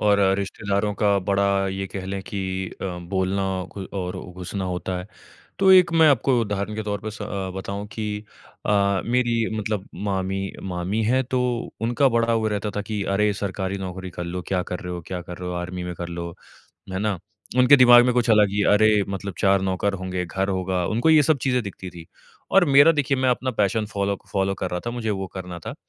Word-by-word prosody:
और 105 -1 +4 0.2
रिश्तेदारों 100 +1 -1
का 100 -1 +2
बड़ा 100 0 +1
ये 95 0 -3
कह 95 0 -6
लें 95 0 -3
कि 100 -2 -5 0.4
अ, - - -3
बोलना 95 +2 -1 0.3
कोई 100 -2 -6
और 90 -1 -3 0.2
घुसना 95 +2 -5
होता 90 0 -3
है। 90 - -7 0.5
तो 190 -1 +5
एक 180 -2 +6
मैं 160 -1 +6
आपको 130 -2 +3
उदाहरण 105 -1 -2
के 110 - -3
तौर 105 -1 -2
पे 110 - -5
स 105 0 -8
अ, 100 -2 -4
बताऊँ 100 +1 -5
कि 110 -1 -4 0.6
अ, 100 -2 +2
मेरी 120 -1 +1
मतलब 105 -1 -3
मामी 95 -1 -2
मामी 95 +4 -2
हैं 130 +4 +2
तो 130 0 -1 0.4
उनका 120 +4 +2
बड़ा 115 0 +2
वो 110 -1 +1
रहता 105 0 -2
था 105 - -1
कि, 105 -1 -3
"अरे! 105 +2 +2
सरकारी 95 -1 -3
नौकरी 95 -1 -6
कर 90 0 -6
लो, 90 +1 -4
क्या 90 -2 0
कर 90 - -2
रहे 90 -2 -5
हो 90 - -4
क्या 90 -1 -4
कर 90 0 -9
रहे 90 - -5
हो? 90 - -3
आर्मी 90 +1 -4
में 90 0 -4
कर 85 0 -6
लो, 85 0 -5 0.6
है 95 - -2
ना?" 105 -2 -1 0.4
उनके 125 +3 +8
दिमाग 120 -2 +8
में 125 - +3
कुछ 120 -1 +2
अलग 105 -2 +5
ही 100 0 0
अरे! 110 +1 +5 0.2
मतलब 100 -1 -4
4 100 -1 +3
नौकर 95 +1 0
होंगे, 90 -1 -2
घर 95 +3 -2
होगा, 95 -2 -1
उनको 120 +9 +2
ये 155 -1 +7
सब 145 0 +2
चीजें 125 -2 +1
दिखती 95 -2 -7
थी। 85 -1 -11 0.4
और 195 -2 +6
मेरा 145 +4 +8
देखिए 145 -2 0
मैं 130 0 +1
अपना 130 +1 0
पैशन 110 +2 0
फ़ॉलो 100 -1 -1 0.2
फ़ॉलो 95 -1 +1
कर 95 -1 -4
रहा 90 0 -2
था 120 - 0
मुझे 120 -2 -3
वो 95 -2 -2
करना 90 -2 -6
था। - - -7
100 Hz, 215 wpm, -23 LUFS, 95-110 Hz, 0.6 s, उनके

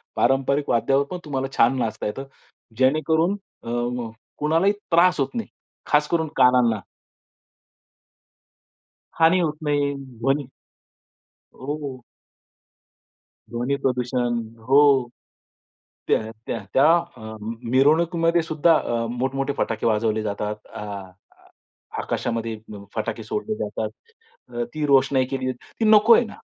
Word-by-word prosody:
पारंपरिक 135 +3 +1
वाद्यावर 135 +5 +2
पण 180 - -3
तुम्हाला 135 -2 -2
छान 125 +3 +4
नाचता 110 -2 -2
येतं. 135 +6 -4 0.5
जेणेकरून 160 +8 +2 0.3
अ, - - -12
म 120 -1 -2 0.3
कोणालाही 165 +7 +2 0.2
त्रास 170 -1 +4
होत 135 - -1
नाही. 230 - -3 0.4
खास 150 0 +3
करून 160 -2 +1
कानांना. 125 -4 +4 2.4
हानी 165 +3 +4
होत 155 -3 -1
नाही. 145 -1 +1 0.3
ध्वनी 135 +4 +1 1.1
हो. 140 -1 -5 1.5
ध्वनी 120 +4 -1
प्रदूषण. 125 -2 0 0.3
हो. 135 -2 +5 1.0
त्या 110 -1 -2
त्या 135 +3 +6 0.3
अं, 110 0 -7 0.2
मिरवणुकीमध्ये 165 +5 +3
सुद्धा 160 +1 +3
अ, 115 -1 -2
मोठमोठे 135 +3 -1
फटाके 115 0 -1
वाजवले 110 0 +1
जातात. 105 0 -4
आ 105 - -6
आ 100 -2 -11 0.6
आकाशामध्ये 115 -1 -3
म 100 -1 -9
फटाके 115 0 -3
सोडले 210 - -3
जातात. - - -3 0.6
अ, 120 -1 -3
ती 150 -1 -1
रोषणाई 135 -1 +4
केली. 130 -1 -1
ती 175 - -7
नको 220 +2 +7
आहे 240 - +4
ना, - - -10
135 Hz, 115 wpm, -23 LUFS, 115-150 Hz, 2.4 s, नको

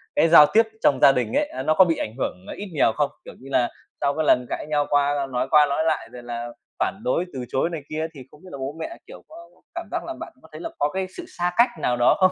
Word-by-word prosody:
cái - - +4
giao 160 -2 +9
tiếp 225 - +7 0.2
trong 135 -3 +4
gia 140 - +8
đình 125 -4 -1
ấy, - - +1
à, 130 - -6
nó 155 - +2
có 185 +4 +6
bị 165 -2 +1
ảnh 110 - -4
hưởng 90 -7 -3
ít 205 0 -6
nhiều 140 -2 +3
không? 145 -2 +1 0.2
Kiểu - - -10
như 135 - -12
là, 125 -3 +2 0.3
sau 140 - +2
cái 155 - -1
lần 125 -3 +4
cãi - - -4
nhau 145 -1 +1
qua 145 -1 +1
nói 125 +1 -1
qua 150 -1 +7
nói 145 +2 0
lại 160 - -1
rồi 125 -1 -10
là 120 0 -5 0.3
phản 195 - -1
đối, 215 -8 0
từ 130 -2 -5
chối 135 - 0
này 165 -3 -5
kia 155 +1 -2
thì 140 - -11
không 150 - -18
biết 185 - -12
là - - -7
bố 135 +2 -5
mẹ, 335 - -6
kiểu, - - -12
có 315 - -14 0.4
cảm - - -5
giác - - -2
là - - -5
bạn - - -8
có - - -17
thấy - - -9
là 330 - -4
có 145 - +2
cái 190 +4 -3
sự - - -6
xa 175 0 0
cách 240 +2 +6
nào 125 - 0
đó 120 - +4
không? 185 -1 +5
145 Hz, 290 wpm, -23 LUFS, 130-170 Hz, 0.4 s, giao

